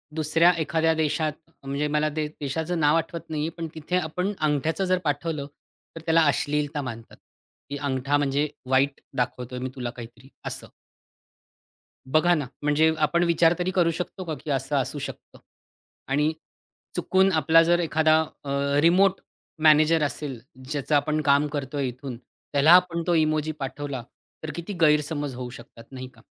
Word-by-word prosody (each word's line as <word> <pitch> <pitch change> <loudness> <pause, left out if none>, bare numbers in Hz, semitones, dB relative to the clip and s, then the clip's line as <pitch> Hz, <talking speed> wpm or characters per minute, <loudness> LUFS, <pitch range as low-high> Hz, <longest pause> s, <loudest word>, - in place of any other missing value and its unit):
दुसऱ्या 165 +2 +4
एखाद्या 160 +1 +1
देशात 155 -1 0 0.3
म्हणजे 140 +2 -2
मला 150 +1 +1
ते 155 -1 -1
देशाचं 160 +5 -2
नाव 150 0 +4
आठवत 165 0 -4
नाही 155 -2 -2
आहे, - - -2
पण 165 -1 -4
तिथे 160 +3 -2
आपण 180 +4 -2
अंगठ्याचं 155 +4 0
जर 185 0 +2
पाठवलं, 145 0 -2 0.5
तर 165 - -7
त्याला 165 0 +4
अश्लीलता 145 +1 0
मानतात, 115 -3 -8 0.5
की 145 - -4
अंगठा 140 0 0
म्हणजे 145 +1 +1 0.2
वाईट 135 +1 +2 0.2
दाखवतोय 125 0 -2
मी 130 +1 -3
तुला 125 -2 -4
काहीतरी 120 +2 -11 0.2
असं. - - -5 1.4
बघा 155 +6 +3
ना, 150 -5 -2 0.2
म्हणजे 150 +2 +3
आपण 170 +3 +2
विचार 170 0 +4
तरी 180 +1 0
करू 175 -3 +2
शकतो 180 +3 -5
का, 160 -3 -3
की 145 +2 -8
असं 135 +1 0
असू 140 +2 -1
शकतं - - -8 0.7
आणि 150 +3 +2 0.6
चुकून 190 +1 +3
आपला 160 +1 +5
जर 175 +1 +3
एखादा 160 -1 +3 0.2
अ, 140 - -5 0.3
रिमोट 185 +4 +4 0.4
मॅनेजर 155 +1 +5
असेल, 145 -3 -3 0.3
ज्याचं 150 0 -1
आपण 150 +1 +2
काम 140 0 +3
करतोय 140 -1 -2
इथून, 125 0 -7 0.4
त्याला 145 +3 +5
आपण 180 -2 +5
तो 175 - +2
इमोजी 155 -1 +1
पाठवला 135 -1 -4 0.4
तर 155 - -5
किती 170 +4 -5
गैरसमज 150 -2 +2
होऊ 125 0 -6
शकतात 115 -2 -13
नाही 130 -1 -7
का? 115 - -19
150 Hz, 155 wpm, -25 LUFS, 140-165 Hz, 1.4 s, आपला